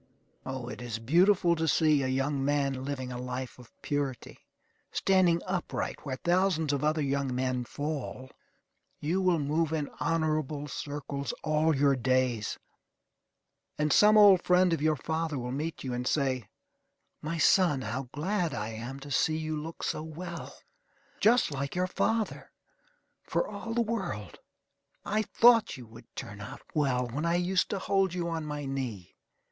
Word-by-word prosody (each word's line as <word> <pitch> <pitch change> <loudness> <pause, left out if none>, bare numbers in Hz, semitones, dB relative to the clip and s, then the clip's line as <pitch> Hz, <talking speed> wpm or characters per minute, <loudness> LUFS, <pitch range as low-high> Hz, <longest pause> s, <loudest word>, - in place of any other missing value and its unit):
O, 130 -2 -4
it 125 - -7
is 120 -2 -4
beautiful 170 - +4
to 160 0 -1
see 155 -2 +4
a 130 - 0
young 135 +1 0
man 140 -2 0
living 130 -3 -4
a 125 - -5
life 125 0 -5
of 120 -2 -15
purity, 140 -4 -3 0.5
standing 180 -3 +3
upright 185 -2 -3
where 135 -3 -3
thousands 175 -1 +1
of 140 - -1
other 155 0 +1
young 140 -2 -1
men 125 -1 -1
fall. 140 -2 -5 0.7
You 170 +6 0
will 180 -2 +3
move 155 +2 0
in 155 -3 -2
honorable 155 -3 0
circles 140 -2 -4
all 155 0 +2
your 140 0 +4
days; 130 -3 0 1.2
and 150 0 +2
some 210 +1 +6
old 200 -4 +8
friend 180 -1 +4
of 160 - -1
your 155 0 +3
father 160 0 -2
will 125 -1 -4
meet 155 +5 -4
you 130 -2 -3
and 125 +1 -2
say: 130 -8 0 0.7
"My 165 +2 -3
son, 165 -4 +4
how 125 +4 -4
glad 175 0 -1
I 105 +1 -3
am 120 +5 -6
to 145 +1 -9
see 155 +4 +2
you 155 0 -3
look 160 +2 -6
so - - -1
well. 170 +2 -7 0.6
Just 230 -5 +4
like 140 +1 -3
your 180 +1 +1
father, 220 +4 -1 0.7
for - - -1
all 230 - -5
the 240 - +3
world. 190 - -4 0.7
I 215 +1 +1
thought 230 - +4
you 125 - -10
would 115 +1 -14
turn 105 0 -7
out 135 +8 -8
well 130 -4 +1
when 135 +6 -4
I 170 - +2
used 180 +2 +1
to 200 - -1
hold 195 -1 +1
you 175 -1 -2
on 160 -2 -3
my 145 -1 -4
knee. 125 -9 -5
150 Hz, 165 wpm, -29 LUFS, 130-170 Hz, 1.2 s, old